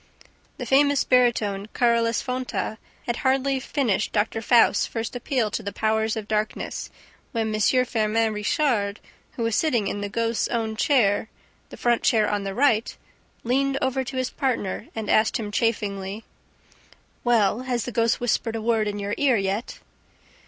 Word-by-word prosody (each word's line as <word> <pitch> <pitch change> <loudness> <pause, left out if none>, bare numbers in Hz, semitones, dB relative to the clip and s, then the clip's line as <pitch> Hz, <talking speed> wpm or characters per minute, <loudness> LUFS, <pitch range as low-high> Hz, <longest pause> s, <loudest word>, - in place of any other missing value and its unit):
The - - -5
famous 285 +1 +3
baritone, 225 -6 +2
Carolus 235 -1 +2
Fonta, 250 -4 -3 0.3
had 240 - -2
hardly 270 0 +1
finished 250 -7 -1
Doctor 220 +1 0
Faust's 230 +1 +4
first 225 +1 -4
appeal 245 -3 -1
to - - -2
the 200 -1 -5
powers 220 +2 0
of 215 -2 -5
darkness, 215 0 -2 0.4
when 220 -2 -1
M. 250 +4 +3
Firmin 225 -1 +1
Richard, 210 -1 0 0.3
who 235 - -4
was 230 -2 0
sitting 245 -10 +1
in 205 - -3
the 205 - -3
ghost's 230 +2 0
own 225 -2 -2
chair, 220 -4 +2 0.4
the - - -11
front 240 -1 +1
chair 215 -3 +3
on 205 -1 -1
the 195 0 -4
right, 235 -4 +2 0.5
leaned 270 +3 +1
over 265 0 0
to 260 +1 -6
his 255 -1 -1
partner 230 -8 -2
and 220 -2 -4
asked 215 +1 +3
him 210 -2 -5
chaffingly: 205 -2 -2 1.0
"Well, 225 -3 +3
has 250 -2 -2
the 245 - -4
ghost 230 0 +1
whispered 230 -1 0
a - - -2
word 225 -2 +1
in 205 0 -3
your 205 0 -3
ear 270 -5 +3
yet?" 195 +3 -3
230 Hz, 160 wpm, -24 LUFS, 210-250 Hz, 1.0 s, Faust's